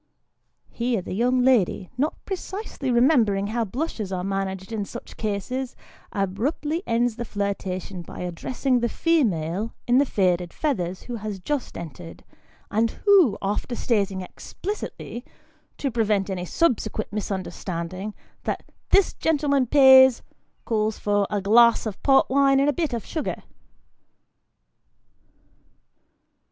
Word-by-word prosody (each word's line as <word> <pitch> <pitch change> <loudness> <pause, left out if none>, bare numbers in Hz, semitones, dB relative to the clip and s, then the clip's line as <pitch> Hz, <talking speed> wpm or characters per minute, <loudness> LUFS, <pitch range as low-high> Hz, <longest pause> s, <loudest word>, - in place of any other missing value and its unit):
Here 235 -2 -1
the - - -6
young 250 +5 +2
lady, 210 -7 +2
not 285 +5 0
precisely 385 -6 -5
remembering 235 -6 +3
how 235 -1 +1
blushes 225 - -4
are 180 -1 -2
managed 195 0 -3
in 220 -2 -2
such 235 +4 -9
cases, 235 +5 -3 0.4
abruptly 260 - -1
ends 235 0 +1
the 240 - -3
flirtation 195 -3 -3
by 170 - -9
addressing 245 +9 -1
the 235 0 0
female 215 - 0
in 245 +2 +4
the 285 - +4
faded 180 -5 +1
feathers 185 - -2
who 240 -1 -5
has 210 -2 -5
just 285 +8 -3
entered, 165 +1 -9 0.5
and 225 +2 +2 0.2
who, 370 - +6
after 210 +5 -2
stating 200 -6 0
explicitly, 245 - -6 0.5
to 275 - -2
prevent 210 -4 +1
any 180 -1 -3
subsequent 225 - 0
misunderstand 185 -4 -4
ing, 200 +3 -6 0.3
that - - -2 0.2
" - - -46
this 395 -1 +4
gentleman 280 -4 +1
pays," 265 -2 +7 0.4
calls 215 -1 0
for 205 -1 +1
"a 205 - -1
glass 235 +5 +5
of 215 -3 -5
port 270 -1 +4
wine 275 0 +4
and 280 +1 +3
a - - +2
bit 320 -3 -1
of 235 - -3
sugar." 315 - -4
225 Hz, 130 wpm, -24 LUFS, 195-265 Hz, 0.5 s, pays